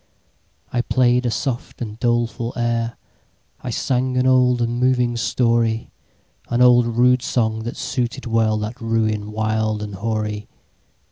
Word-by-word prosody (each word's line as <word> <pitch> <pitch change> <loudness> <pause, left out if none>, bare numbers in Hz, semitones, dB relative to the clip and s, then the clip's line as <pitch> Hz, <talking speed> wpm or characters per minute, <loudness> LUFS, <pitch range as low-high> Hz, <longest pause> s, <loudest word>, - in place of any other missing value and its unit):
I 120 - +2
play'd 125 0 +2
a - - +1
soft 120 +1 -3
and 110 -2 -6
doleful 120 0 0
air,I 120 +1 -5
sang 125 +2 -1
an 125 - +2
old 125 -1 +4
and 120 0 -1
moving 125 -1 +2
story—An 115 0 -2
old 120 -1 +6
rude 125 +2 +3
song, 110 -4 0
that 120 - -5
suited 120 -3 -3
wellThat 110 -1 0
ruin 110 -2 -1
wild 110 0 -1
and 105 -1 -6
hoary. 105 0 -3
120 Hz, 125 wpm, -21 LUFS, 110-125 Hz, -, old